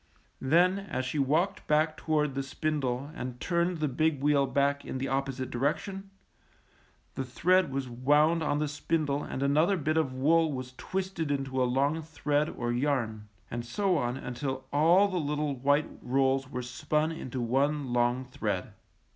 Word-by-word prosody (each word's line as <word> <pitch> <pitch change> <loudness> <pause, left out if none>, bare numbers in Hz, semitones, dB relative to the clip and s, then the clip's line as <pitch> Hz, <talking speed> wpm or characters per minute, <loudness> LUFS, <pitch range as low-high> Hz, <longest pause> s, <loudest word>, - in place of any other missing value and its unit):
Then 175 +8 +4
as 190 -10 -4
she 145 +3 -2
walked 155 +8 +1
back 155 +1 +2
toward 150 -3 0
the 135 - -1
spindle 135 -1 -2
and 125 -6 -6
turned 170 +2 0
the 155 -1 0
big 150 +2 +1
wheel 140 -1 +3
back 140 +1 +1
in - - -5
the 130 - -2
oppo 135 0 0
site 130 -1 -5
direction, 190 +10 -2 1.0
the 135 - -3
thread 175 +6 +2
was 135 -1 -2
wound 145 +7 +3
on 145 -2 0
the 150 0 0
spindle 150 -1 -1
and 135 - -4
another 155 +8 +3
bit 155 0 0
of 155 -5 +1
wool 155 +5 +3
was 130 -2 -5
twisted 185 -3 -3
into 135 -2 -1
a - - +4
long 140 +5 +1
thread 150 -1 -1
or 120 0 -3
yarn, 120 -5 -1 0.2
and 120 0 -3
so 185 +11 0
on 120 -4 -1
until 130 +1 -4
all 170 +7 +5
the 185 -3 -2
little 150 -1 -1
white 145 +4 +1
rolls 135 +1 +1
were 125 -2 -4
spun 150 +5 -1
into 130 -5 -5
one 135 +2 0
long 120 +1 +1
thread. 105 -7 -3
140 Hz, 170 wpm, -29 LUFS, 130-155 Hz, 1.0 s, all